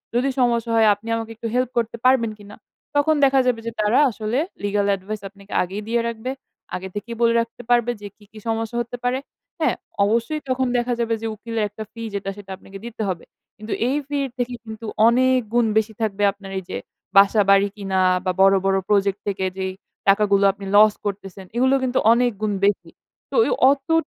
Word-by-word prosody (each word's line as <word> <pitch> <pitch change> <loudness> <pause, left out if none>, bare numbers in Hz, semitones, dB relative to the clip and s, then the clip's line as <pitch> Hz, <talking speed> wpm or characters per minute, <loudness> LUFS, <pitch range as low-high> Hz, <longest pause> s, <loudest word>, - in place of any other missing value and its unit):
যদি 250 +3 +2
সমস্যা 235 -2 +1
হয় 225 -1 +5
আপনি 210 +3 -15
আমাকে 225 0 -5
একটু 230 +1 -5
হেল্প 250 -1 +1
করতে 235 0 -1
পারবেন 255 -3 +4
কিনা?" 205 0 -12 0.4
তখন 300 +2 +3
দেখা 270 0 +4
যাবে 235 -2 +1
যে - - -2
তারা 210 +5 +3
আসলে 220 +4 -2 0.2
legal 205 0 +1
advice 200 +2 -7
আপনাকে 200 0 -18
আগেই 190 +3 -5
দিয়ে 235 +1 +1
রাখবে। 235 +2 -4 0.4
আগে 190 +1 -5
থেকেই 230 +3 -5
বলে 230 0 +4
রাখতে 230 +1 -7
পারবে 240 0 +3
যে 205 - -6
কি, 210 - -20
কি 220 - -11
সমস্যা 225 +1 -2
হতে 240 +1 -6
পারে, 250 +1 +1 0.4
হ্যাঁ? 315 - +2 0.3
অবশ্যই 230 +8 0
তখন 255 0 +1
দেখা 245 0 0
যাবে 230 -1 0
যে 225 - -2
উকিলের 225 +1 -3
একটা 210 +2 -7
ফি 230 - -10
যেটা 195 -1 -3
সেটা 200 -1 -12
আপনাকে 195 +1 -12
দিতে 230 -1 -7
হবে। 175 -3 -4 0.3
কিন্তু 215 +1 -5
এই 265 - +1
ফির 285 -1 -1
থেকে 245 0 -2
কিন্তু 220 0 -8 0.2
অনেক 255 +2 +4
গুণ 240 -1 +4
বেশি 220 0 +1
থাকবে 205 -2 -1
আপনার 195 -1 -12
এই - - -10
যে, - - -2 0.4
বাসা-বাড়ি 200 0 +5
কিনা 195 -2 -1 0.2
বা 185 - +2
বড়, 195 0 +6
বড় 195 0 +3
প্রজেক্ট 200 -1 +2
থেকে 195 -1 -1
যেই 190 0 -2 0.3
টাকাগুলো 200 0 +4
আপনি 200 0 -10
লস 210 0 +7
করতেছেন, 195 -1 -5
এগুলো 260 +3 +3
কিন্তু 255 0 +1
অনেক 245 +1 +3
গুণ 215 -1 0
বেশি। 205 -1 0 0.4
তো - - -4
ওই - - 0 0.2
অতটু 275 +3 0
220 Hz, 195 wpm, -22 LUFS, 200-240 Hz, 0.4 s, লস